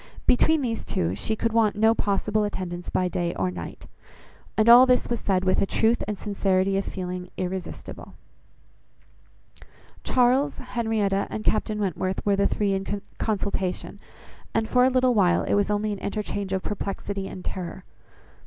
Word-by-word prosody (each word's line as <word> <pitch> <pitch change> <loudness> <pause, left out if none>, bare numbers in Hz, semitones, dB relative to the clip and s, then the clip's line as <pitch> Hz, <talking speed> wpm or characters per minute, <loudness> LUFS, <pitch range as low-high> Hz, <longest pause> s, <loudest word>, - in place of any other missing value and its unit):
Between 310 +4 +3
these 230 -2 -2
two, 85 +1 -1
she 160 - -2
could 230 +1 -1
want 220 -2 +3
no 220 +2 +4
possible 210 0 0
attendance 180 -4 -4
by 185 - +1
day 175 -1 -2
or 95 -1 -1
night. 85 -2 -8 0.7
And 215 +1 +3
all 245 +2 +9
this 250 0 +3
was 235 - 0
said 190 -2 0
with 185 - +2
a 195 - +1
truth 225 +4 +2
and 210 -1 -3
sincerity 195 -2 0
of 195 - 0
feeling 180 -1 -5
irresistible. 185 -1 -6 1.9
Charles, 255 +3 +2
Henrietta, 220 -5 -1
and 215 - -5
Captain 215 0 +1
Wentworth 190 -1 -2
were 200 -1 +3
the 200 0 +2
three 205 -2 0
in 195 +1 -3 0.2
consultation, 200 -3 -2 0.6
and 225 0 +1
for 250 +1 +4
a - - +5
little 255 -1 +3
while 185 -5 +3
it - - -1
was 205 0 +2
only 210 +1 0
an 200 - -6
interchange 205 -1 -3
of 190 -1 -1
perplexity 200 -1 -4
and 185 - -9
terror. 185 0 -5
200 Hz, 160 wpm, -25 LUFS, 185-225 Hz, 1.9 s, all